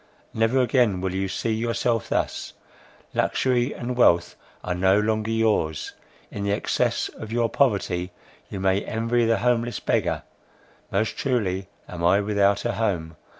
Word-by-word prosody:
never 115 +4 +2
again 120 -6 +2
will 95 0 -2
you 95 +1 -1
see 110 +4 -2
yourself 115 0 -1
thus; - - -2 0.6
luxury 125 0 +1
and 125 +1 -4
wealth 85 -8 +3 0.3
are 90 - -2
no 95 +3 +3
longer 110 +1 0
yours; 110 -9 0 0.4
in 100 - -5
the 100 - 0
excess 100 - 0
of 110 - -8
your 120 0 +2
poverty 100 -8 +1 0.4
you 100 - -5
may 95 +1 +1
envy 115 +1 0
the 115 0 +3
homeless 120 -1 0
beggar; 85 -8 0 0.7
most 105 +3 0
truly 100 -8 -1 0.2
am 85 -1 -7
I 90 +4 +5
without 100 0 +1
a 120 - +1
home! 85 -9 -2
105 Hz, 150 wpm, -24 LUFS, 95-115 Hz, 0.7 s, I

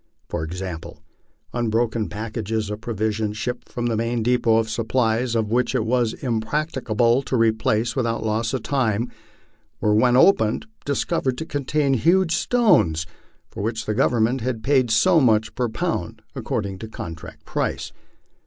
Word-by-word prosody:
For - - -3
example, 90 0 -6 0.5
unbroken 115 -1 0
packages 110 -1 -3
of 105 +1 -5
provisions 110 -1 -2
shipped 125 +2 -4
from 120 - -4
the 115 -1 +1
main 115 +1 -1
depot 120 -1 +3
of 115 -1 +1
supplies, 115 +1 0
and 110 -2 +1
which 120 +3 +1
it 115 -4 +1
was 120 -1 +1
impracticable 120 -1 0
to 135 - -3
replace 110 0 +1
without 115 -3 -1
loss 110 +1 0
of 125 - -4
time, 120 -5 0 0.7
were 105 - +2
when 125 +3 +4
opened 115 - +4 0.2
discovered 135 -2 0
to 160 - -4
contain 145 -1 0
huge 170 +6 +3
stones 140 - +3 0.5
for - - -6
which 110 +1 -2
the 110 - -1
Government 120 +1 +2
had 115 -2 -3
paid 130 -2 +3
so 160 +11 +4
much 110 -5 +2
per 125 -2 -1
pound 110 - -3
according 100 -2 -3
to 110 - -6
contract 85 -5 -9
price. - - -2
115 Hz, 150 wpm, -23 LUFS, 110-125 Hz, 0.7 s, when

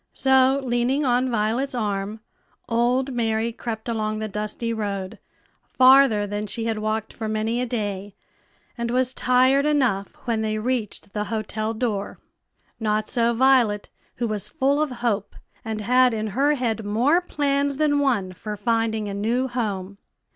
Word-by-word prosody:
So, 265 0 +4
leaning 250 +4 +1
on 250 +1 +2
Violet's 235 +4 0
arm, 210 -1 -2 0.5
old 250 +3 +1
Mary 225 -1 0
crept 225 -1 -6
along 215 -2 -1
the 215 0 -3
dusty 215 +3 -3
road, 200 -2 -4 0.6
farther 260 -5 +6
than 205 +1 -4
she 225 +3 -4
had 225 -2 -1
walked 215 0 -2
for 220 -2 -4
many 220 +3 -1
a 250 - -1
day, 205 -4 -4 0.6
and 235 -1 -3
was 255 +1 +1
tired 255 +2 +3
enough 255 -10 +1
when 230 -3 0
they 215 0 -1
reached 215 -3 -3
the 210 -1 -2
hotel 215 +1 -3
door. 215 -4 -2 0.6
Not 215 -1 -1
so 235 -1 +2
Violet, 240 -4 +3 0.2
who 235 - -2
was 215 -2 -3
full 285 0 +1
of 305 - +1
hope, 235 -5 -2 0.3
and 220 -1 -4
had 250 +2 +4
in 215 0 -2
her 285 +5 +3
head 230 -4 -2
more 245 - +2
plans 280 -4 0
than 295 -1 +2
one 225 -10 0
for 210 +3 -6
finding 220 0 0
a 200 - -4
new 230 +6 0
home. 200 -6 -3
230 Hz, 155 wpm, -23 LUFS, 215-255 Hz, 0.6 s, farther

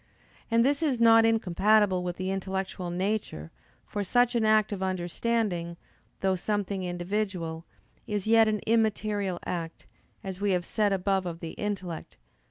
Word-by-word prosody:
And 230 0 +3
this 280 +2 +1
is 280 -7 +1
not 225 -1 +6
incompatible 205 -2 +3
with 180 -1 -4
the 185 +1 -2
intellectual 190 -1 -3
nature: 180 - -3 0.3
for 205 - -3
such 245 +5 +2
an 235 -2 +1
act 215 -1 +3
of 200 -2 -4
understanding, 185 -1 -1 0.4
though 190 -1 +2
something 200 0 -2
individual, 175 -2 -3 0.4
is 205 -2 -2
yet 225 0 +5
an 215 -1 0
immaterial 215 -4 +1
act, 165 -2 -5 0.4
as 190 0 -6
we 205 -1 +2
have 175 -1 0
said 210 +1 +1
above 195 -1 0
of 165 -1 -5
the 165 -1 -6
intellect 190 -5 -5
(Q. - - -31
195 Hz, 155 wpm, -28 LUFS, 180-215 Hz, 0.4 s, not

